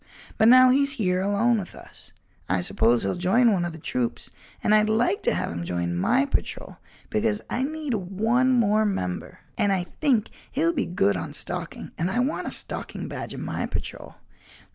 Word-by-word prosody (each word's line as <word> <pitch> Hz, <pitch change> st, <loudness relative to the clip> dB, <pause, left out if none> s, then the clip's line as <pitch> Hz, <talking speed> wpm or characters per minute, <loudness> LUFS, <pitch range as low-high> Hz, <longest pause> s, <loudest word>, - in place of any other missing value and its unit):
But 220 Hz, -, +6 dB
now 255 Hz, +1 st, +8 dB
he's 280 Hz, +1 st, +2 dB
here 185 Hz, -8 st, 0 dB
alone 210 Hz, +4 st, +2 dB
with 185 Hz, -, -8 dB
us, -, -, -12 dB, 0.4 s
I 90 Hz, 0 st, +1 dB
suppose 115 Hz, +6 st, +2 dB
he'll 95 Hz, -, 0 dB
join 210 Hz, +7 st, +3 dB
one 175 Hz, -3 st, 0 dB
of 175 Hz, -, -3 dB
the 160 Hz, -, -9 dB
troops 125 Hz, -6 st, -3 dB, 0.3 s
and 210 Hz, -, +3 dB
I'd 215 Hz, 0 st, +4 dB
like 245 Hz, -, +1 dB
to -, -, +1 dB
have -, -, -2 dB
him 85 Hz, 0 st, -4 dB
join 85 Hz, 0 st, -2 dB
my 245 Hz, -, +2 dB
patrol 280 Hz, -, -4 dB, 0.3 s
because 215 Hz, -1 st, 0 dB
I 245 Hz, -, -1 dB
need 300 Hz, 0 st, -3 dB
one 220 Hz, +6 st, +1 dB
more 220 Hz, -3 st, +3 dB
member 90 Hz, -, -3 dB, 0.2 s
and 205 Hz, -, +3 dB
I 190 Hz, -2 st, +1 dB, 0.2 s
think 250 Hz, -8 st, +2 dB, 0.2 s
he'll 330 Hz, +5 st, +1 dB
be 270 Hz, -, -1 dB
good 100 Hz, -, +1 dB
on -, -, -5 dB
stalking -, -, -4 dB
and 170 Hz, +3 st, 0 dB
I 190 Hz, -, -2 dB
want 260 Hz, +5 st, -1 dB
a -, -, -3 dB
stalking -, -, -4 dB
badge -, -, -6 dB
in -, -, -6 dB
my -, -, -3 dB
patrol. -, -, -6 dB
215 Hz, 190 wpm, -25 LUFS, 175-255 Hz, 0.4 s, now